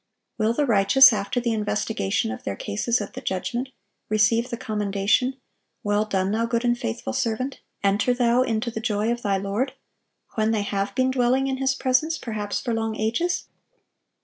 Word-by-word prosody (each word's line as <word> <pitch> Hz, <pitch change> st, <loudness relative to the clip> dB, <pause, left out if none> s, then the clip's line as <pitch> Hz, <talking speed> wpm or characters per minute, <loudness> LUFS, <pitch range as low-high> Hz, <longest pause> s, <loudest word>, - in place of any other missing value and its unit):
Will 220 Hz, +1 st, +2 dB
the 290 Hz, +4 st, +1 dB
righteous, 250 Hz, +4 st, +7 dB
after 205 Hz, +4 st, -1 dB
the 235 Hz, -1 st, 0 dB
investigation 210 Hz, -, -1 dB
of 110 Hz, -, -7 dB
their 100 Hz, -, -3 dB
cases 215 Hz, -, -1 dB
at 205 Hz, -, -6 dB
the -, -, -7 dB
judgment, 240 Hz, +7 st, -3 dB, 0.4 s
receive 220 Hz, +3 st, +3 dB
the 235 Hz, -, -4 dB
commendation, 210 Hz, +4 st, 0 dB, 0.5 s
"Well 205 Hz, +1 st, +1 dB
done, 190 Hz, -2 st, 0 dB
thou 230 Hz, +2 st, 0 dB
good 235 Hz, +1 st, -1 dB
and 240 Hz, 0 st, +3 dB
faithful 110 Hz, -, -4 dB
servant,... 240 Hz, -, -2 dB, 0.2 s
enter 200 Hz, +5 st, +2 dB
thou 245 Hz, 0 st, +3 dB
into 235 Hz, -2 st, -1 dB
the 220 Hz, -, -4 dB
joy 220 Hz, 0 st, 0 dB
of 240 Hz, 0 st, -2 dB
thy 200 Hz, -3 st, +1 dB
Lord,"(975) 220 Hz, +9 st, -6 dB
when 215 Hz, 0 st, +2 dB
they 220 Hz, -2 st, +1 dB
have 200 Hz, 0 st, -2 dB
been 260 Hz, 0 st, +2 dB
dwelling 260 Hz, +1 st, +2 dB
in 265 Hz, -1 st, -1 dB
His 270 Hz, 0 st, +1 dB
presence, 285 Hz, +5 st, +1 dB
perhaps 215 Hz, -3 st, -3 dB
for 240 Hz, -, -2 dB
long 225 Hz, -1 st, -1 dB
ages? 230 Hz, +12 st, -1 dB
225 Hz, 175 wpm, -24 LUFS, 205-250 Hz, 0.5 s, righteous